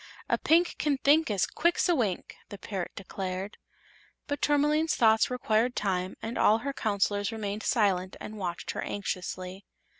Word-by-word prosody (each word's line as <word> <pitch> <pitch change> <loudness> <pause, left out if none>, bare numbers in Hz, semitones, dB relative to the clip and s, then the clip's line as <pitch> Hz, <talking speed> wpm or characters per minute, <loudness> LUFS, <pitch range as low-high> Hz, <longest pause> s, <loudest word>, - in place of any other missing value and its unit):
"A - - +1
Pink 340 +2 +3
can 290 -2 +1
think 295 +3 +4
As 200 -3 +2
quick's 340 +3 +1
a 350 - +4
wink!" 215 - -1
the 205 - -8
parrot 190 -2 -5
declared. 190 +1 -5 0.7
But 285 -1 -3
Tourmaline's 295 +2 +2
thoughts 220 -1 +4
required 245 -1 +1
time 185 -2 -1
and 225 +2 -4
all 215 - +5
her 280 - -1
Counselors 205 -3 0
remained 210 -1 -4
silent 190 -6 +1
and 215 0 -8
watched 175 -3 -3
her - - -4
anxiously. 185 -1 -4
215 Hz, 155 wpm, -28 LUFS, 195-275 Hz, 0.7 s, all